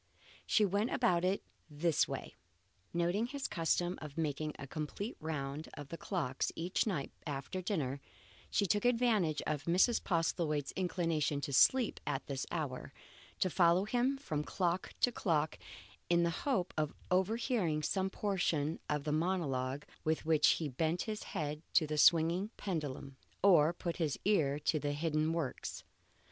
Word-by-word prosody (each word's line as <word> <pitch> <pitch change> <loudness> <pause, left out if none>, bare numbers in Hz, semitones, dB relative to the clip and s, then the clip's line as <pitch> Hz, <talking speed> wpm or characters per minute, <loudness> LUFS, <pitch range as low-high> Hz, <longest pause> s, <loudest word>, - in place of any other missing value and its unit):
She 215 - +4
went 205 +4 +1
about 180 -8 +2
it 190 +2 +1 0.3
in 150 - -14
this 165 0 +3
way. - - -5 0.6
Noting 175 +7 +1
his 275 +1 -4
custom 175 +1 0
of 150 -1 -8
making 155 -1 -2
a - - -7
complete 155 - -5
round 150 -1 -4
of 145 -2 -8
the - - -5
clocks 155 -11 -2
each 175 +6 0
night 170 -10 -2 0.2
after 145 +6 -4
dinner, 145 -8 -2 0.5
she 205 - +2
took 205 +2 +1
advantage 230 -10 +2
of 150 -2 -2
Mrs. 185 +7 +3
Postlethwaite's 165 -4 0
inclination 165 -5 0
to 140 -1 -4
sleep 250 - +4
at 140 -2 -2
this 135 -2 -4
hour, 150 -7 -4 0.5
to - - +4
follow 175 +1 +4
him 250 +5 +1
from 155 - -3
clock 180 +2 -1
to 245 - +4
clock 160 -9 0 0.5
in 170 0 +4
the 170 - +2
hope 185 - -1
of 155 -1 -1 0.2
overhearing 190 - +1
some 190 +4 0
portion 175 -7 0
of 150 -1 0
the 150 - -1
monologue 145 -5 -1 0.2
with 160 0 0
which 155 -2 +4
he 160 - -2
bent 160 +6 0
his 215 -1 -4 0.2
head 150 0 -2
to 160 - +6
the 150 0 -2
swinging 170 +6 +5
pendulum, 145 -7 -4 0.3
or 170 -6 +6
put 170 -1 -4
his 160 -5 0
ear 155 -9 +3
to 155 +1 0
the 145 0 -1
hidden 155 +1 0
works. 165 -6 -3
165 Hz, 155 wpm, -34 LUFS, 150-190 Hz, 0.6 s, to